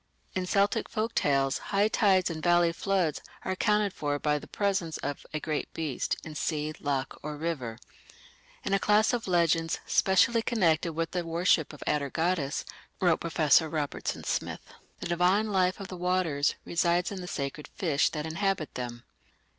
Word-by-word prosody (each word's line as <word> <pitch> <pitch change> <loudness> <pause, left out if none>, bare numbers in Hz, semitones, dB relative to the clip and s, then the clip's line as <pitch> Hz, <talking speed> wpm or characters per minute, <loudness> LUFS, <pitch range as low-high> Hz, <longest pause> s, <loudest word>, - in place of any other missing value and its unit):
In 185 -1 -2
Celtic 200 +2 +1
folk 225 0 -2
tales 135 -2 +2
high 200 +1 +3
tides 190 -5 +3
and 160 -1 -5
valley 175 0 +4
floods 185 -5 0 0.2
are - - -1
accounted 210 +1 +1
for 145 -1 -1
by 150 0 0
the - - -12
presence 195 -5 -1
of 145 0 -5
a 155 - -2
"great 155 -1 -3
beast" 155 -5 -1
in 160 - -8
sea, 150 0 -2
loch, 135 -2 -2
or 150 0 -5
river. 145 -8 -3 0.9
In - - -1
a 195 - +4
class 210 +4 +3
of 235 -4 -2
legends, 165 -2 +2
"specially 225 +5 +3
connected 170 -8 +1
with 165 +1 -2
the 180 -1 -1
worship 165 -1 +2
of 150 - -10
Atargatis", 150 +1 0 0.3
wrote 175 -3 +3
Professor 160 -1 +3
Robertson 150 -2 -3
Smith, - - -3 0.3
"the - - -4
divine 180 +5 +2
life 185 -1 +2
of 195 - -6
the 185 - -6
waters 175 -5 +1
resides 175 +2 +1
in 195 -2 -5
the 180 - -7
sacred 140 -1 -4
fish 160 -8 +1
that 150 -1 -4
inhabit 165 0 -1
them. 120 -1 -5
170 Hz, 165 wpm, -29 LUFS, 150-190 Hz, 0.9 s, valley